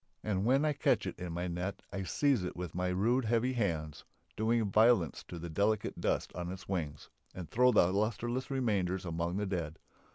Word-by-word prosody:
And 100 Hz, -2 st, 0 dB
when 135 Hz, +5 st, +3 dB
I 150 Hz, -, +2 dB
catch 140 Hz, -, +2 dB
it -, -, -5 dB
in 90 Hz, -1 st, -4 dB
my 85 Hz, +2 st, -2 dB
net 90 Hz, +3 st, -4 dB
I 100 Hz, -, -2 dB
seize 130 Hz, -, +2 dB
it 90 Hz, -, -4 dB
with 90 Hz, -2 st, -5 dB
my 90 Hz, +1 st, -1 dB
rude 115 Hz, +8 st, +1 dB
heavy 120 Hz, +3 st, +1 dB
hands, 80 Hz, -, -2 dB, 0.3 s
doing 110 Hz, -1 st, +1 dB
violence 110 Hz, -, +4 dB
to 90 Hz, -, -7 dB
the 85 Hz, +1 st, -6 dB
delicate 100 Hz, +6 st, 0 dB
dust -, -, 0 dB
on 90 Hz, 0 st, -4 dB
its 95 Hz, 0 st, -8 dB
wings, 80 Hz, -6 st, -4 dB, 0.3 s
and 90 Hz, -3 st, -6 dB
throw 125 Hz, +2 st, +5 dB
the 95 Hz, -5 st, +4 dB
lusterless 120 Hz, +5 st, -1 dB
remainders 100 Hz, -9 st, 0 dB
among 85 Hz, +1 st, -2 dB
the 105 Hz, -, -1 dB
dead. 85 Hz, -5 st, -3 dB
95 Hz, 195 wpm, -32 LUFS, 90-115 Hz, 0.3 s, throw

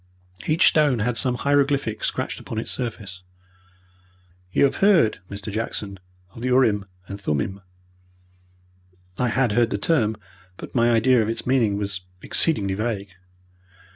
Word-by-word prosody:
Each 155 Hz, +2 st, +4 dB
stone 150 Hz, -5 st, +4 dB
had 115 Hz, +2 st, -1 dB
some 125 Hz, +1 st, +1 dB
hieroglyphic 140 Hz, -4 st, +1 dB
scratched -, -, -2 dB
upon 110 Hz, -, -7 dB
its 110 Hz, -, -3 dB
surface. 105 Hz, -7 st, -5 dB, 1.3 s
"You -, -, +2 dB
have 140 Hz, -, +2 dB
heard, 190 Hz, -, +4 dB
Mr. 100 Hz, +2 st, -7 dB
Jackson, 105 Hz, -3 st, -4 dB, 0.3 s
of 115 Hz, -, -11 dB
the 125 Hz, -, -2 dB
urim 120 Hz, -6 st, +3 dB, 0.2 s
and 100 Hz, 0 st, -8 dB
thummim?" 95 Hz, +4 st, -2 dB, 1.6 s
I 125 Hz, -, +2 dB
had 125 Hz, 0 st, +1 dB
heard 115 Hz, +2 st, +2 dB
the -, -, -1 dB
term, 110 Hz, -4 st, +1 dB, 0.4 s
but -, -, -9 dB
my 120 Hz, -1 st, +3 dB
idea 120 Hz, +1 st, +4 dB
of 110 Hz, -, -1 dB
its 115 Hz, -, -3 dB
meaning 120 Hz, -6 st, +2 dB
was 100 Hz, -2 st, -3 dB, 0.2 s
exceedingly 105 Hz, -13 st, +1 dB
vague. 105 Hz, -1 st, -3 dB
115 Hz, 140 wpm, -23 LUFS, 100-130 Hz, 1.6 s, Each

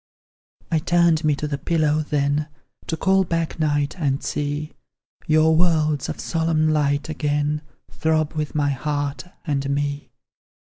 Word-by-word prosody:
I 160 Hz, -, +3 dB
turned 170 Hz, 0 st, +3 dB
me 150 Hz, -1 st, +3 dB
to 150 Hz, -, -3 dB
the 140 Hz, -1 st, -3 dB
pillow, 155 Hz, -2 st, +1 dB
then, 145 Hz, 0 st, 0 dB, 0.4 s
To 160 Hz, -, -2 dB
call 190 Hz, +3 st, +3 dB
back 165 Hz, -2 st, -2 dB
night, 145 Hz, +2 st, 0 dB
and 140 Hz, -3 st, 0 dB
see 145 Hz, +1 st, -3 dB, 0.5 s
Your 155 Hz, +1 st, +4 dB
worlds 155 Hz, -4 st, +2 dB
of -, -, -5 dB
solemn 160 Hz, -1 st, +1 dB
light, 145 Hz, -1 st, +1 dB
again, 150 Hz, -1 st, -1 dB, 0.3 s
Throb 155 Hz, -1 st, 0 dB
with 155 Hz, -2 st, -3 dB
my 145 Hz, -1 st, +2 dB
heart, 145 Hz, 0 st, -2 dB, 0.2 s
and 140 Hz, -3 st, -1 dB
me! 145 Hz, 0 st, -2 dB
150 Hz, 140 wpm, -22 LUFS, 145-160 Hz, 0.5 s, Your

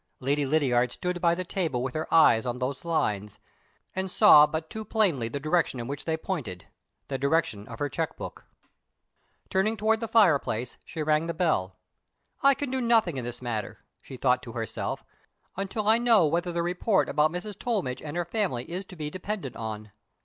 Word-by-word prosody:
Lady 140 Hz, +2 st, 0 dB
Lydiard 125 Hz, -5 st, +2 dB
stood 180 Hz, +3 st, -3 dB
by 170 Hz, -1 st, +3 dB
the 185 Hz, -, -3 dB
table 165 Hz, -10 st, -2 dB
with 130 Hz, -, -3 dB
her 155 Hz, 0 st, -4 dB
eyes 115 Hz, -8 st, +6 dB
on 125 Hz, -1 st, -3 dB
those 130 Hz, +2 st, -3 dB
lines, 105 Hz, -, -1 dB, 0.6 s
and 190 Hz, 0 st, -2 dB
saw 165 Hz, -7 st, +8 dB
but 160 Hz, +1 st, -4 dB
too 220 Hz, +5 st, -6 dB
plainly 185 Hz, -, +1 dB
the 140 Hz, -, -4 dB
direction 155 Hz, -3 st, 0 dB
in 120 Hz, -, -5 dB
which 140 Hz, +1 st, -5 dB
they 160 Hz, -1 st, 0 dB
pointed 130 Hz, -, -5 dB, 0.4 s
the 135 Hz, -1 st, -3 dB
direction 140 Hz, -8 st, 0 dB
of 115 Hz, -, -8 dB
her 145 Hz, -, -1 dB
check 140 Hz, -, -3 dB
book. -, -, -8 dB, 1.1 s
Turning 215 Hz, +4 st, +1 dB
towards 220 Hz, +1 st, +2 dB
the 230 Hz, -, -3 dB
fireplace, 145 Hz, -, +2 dB
she 160 Hz, -, -4 dB
rang 155 Hz, +1 st, +1 dB
the 170 Hz, -, -3 dB
bell. 100 Hz, -, 0 dB, 0.7 s
"I 275 Hz, 0 st, +6 dB
can 285 Hz, -2 st, -4 dB
do 260 Hz, 0 st, -1 dB
nothing 225 Hz, -, +3 dB
in 125 Hz, -, -4 dB
this 120 Hz, +1 st, -6 dB
matter," 110 Hz, -4 st, -4 dB, 0.2 s
she -, -, -10 dB
thought -, -, +2 dB
to -, -, -9 dB
herself, -, -, -4 dB, 0.5 s
"until 200 Hz, +2 st, -3 dB
I 220 Hz, +2 st, +6 dB
know 230 Hz, -7 st, +5 dB
whether 175 Hz, +3 st, 0 dB
the 170 Hz, 0 st, -1 dB
report 180 Hz, +4 st, +1 dB
about 150 Hz, +1 st, +2 dB
Mrs. 180 Hz, +5 st, -5 dB
Tollmidge 190 Hz, -, -2 dB
and 155 Hz, +2 st, -6 dB
her 175 Hz, -, 0 dB
family 170 Hz, -, -2 dB
is 185 Hz, +3 st, -4 dB
to 185 Hz, -, -12 dB
be 150 Hz, -3 st, -5 dB
depended 185 Hz, -, -5 dB
on. 110 Hz, -1 st, -6 dB
160 Hz, 195 wpm, -27 LUFS, 130-190 Hz, 1.1 s, saw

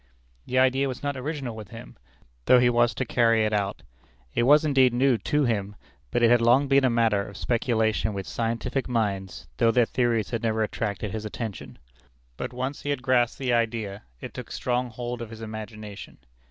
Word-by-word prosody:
_ -, -, -36 dB, 0.4 s
The 130 Hz, -, -1 dB
idea 130 Hz, +1 st, +3 dB
was 130 Hz, 0 st, -6 dB
not 145 Hz, -1 st, -1 dB
original 135 Hz, -3 st, -4 dB
with 110 Hz, -2 st, -8 dB
him, -, -, -11 dB, 0.5 s
though 125 Hz, -, +7 dB
he 120 Hz, 0 st, +4 dB
was 120 Hz, 0 st, +2 dB
to 130 Hz, -, -2 dB
carry 115 Hz, -2 st, +3 dB
it 105 Hz, -, -1 dB
out. 100 Hz, -1 st, -1 dB, 0.5 s
It -, -, +1 dB
was 150 Hz, +2 st, +6 dB
indeed 130 Hz, -4 st, +4 dB
new 130 Hz, -2 st, +3 dB
to 150 Hz, 0 st, +1 dB
him; 105 Hz, -4 st, -1 dB, 0.3 s
but 120 Hz, -, 0 dB
it 115 Hz, -, +6 dB
had 120 Hz, -1 st, +5 dB
long 125 Hz, +4 st, +4 dB
been 135 Hz, 0 st, +4 dB
a 130 Hz, -, +4 dB
matter 115 Hz, -4 st, +2 dB
of 100 Hz, 0 st, -8 dB
speculation 110 Hz, -2 st, 0 dB
with 95 Hz, -1 st, -4 dB
scientific 115 Hz, -, -2 dB
minds, 100 Hz, -5 st, -2 dB
though 115 Hz, -, +4 dB
their 120 Hz, +1 st, +4 dB
theories 115 Hz, -6 st, 0 dB
had 115 Hz, -, -2 dB
never 110 Hz, -1 st, 0 dB
attracted 105 Hz, -1 st, -3 dB
his 110 Hz, +1 st, -4 dB
attention. 100 Hz, -, -6 dB, 0.6 s
But -, -, -5 dB
once 130 Hz, +3 st, -4 dB
he 145 Hz, -, -5 dB
had 140 Hz, -3 st, -2 dB
grasped 120 Hz, -1 st, +2 dB
the 130 Hz, -3 st, -1 dB
idea, 110 Hz, -4 st, -1 dB, 0.2 s
it -, -, -8 dB
took -, -, -8 dB
strong 125 Hz, 0 st, -1 dB
hold 120 Hz, +1 st, -5 dB
of 115 Hz, -, -6 dB
his 115 Hz, 0 st, -10 dB
imagination. 110 Hz, -2 st, -8 dB
115 Hz, 200 wpm, -26 LUFS, 110-125 Hz, 0.6 s, though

